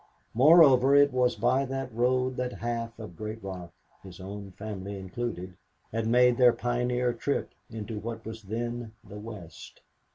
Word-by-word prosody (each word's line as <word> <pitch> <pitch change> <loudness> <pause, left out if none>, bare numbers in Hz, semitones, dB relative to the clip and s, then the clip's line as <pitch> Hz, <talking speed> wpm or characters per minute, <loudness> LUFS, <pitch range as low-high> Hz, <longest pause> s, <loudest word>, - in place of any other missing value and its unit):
Moreover, 135 -1 +7
it 145 -1 +5
was 125 -1 +2
by 125 +5 +2
that 135 -2 -4
road 125 +2 +1
that 125 0 -2
half 115 0 -4
of 105 -6 -9
Great 110 +3 -6
Rock, 90 -3 -7 0.3
his 95 -2 -12
own 100 +1 -7
family 100 -1 -6
included, 95 -1 -5 0.4
had 115 0 -1
made 125 +1 +4
their 125 -2 +6
pioneer 125 0 0
trip 140 +4 -2 0.2
into 110 -1 -6
what 115 +1 -6
was 110 0 -7
then 115 +2 -4
the 105 - -9
West. 100 -8 -10
115 Hz, 155 wpm, -28 LUFS, 105-125 Hz, 0.4 s, Moreover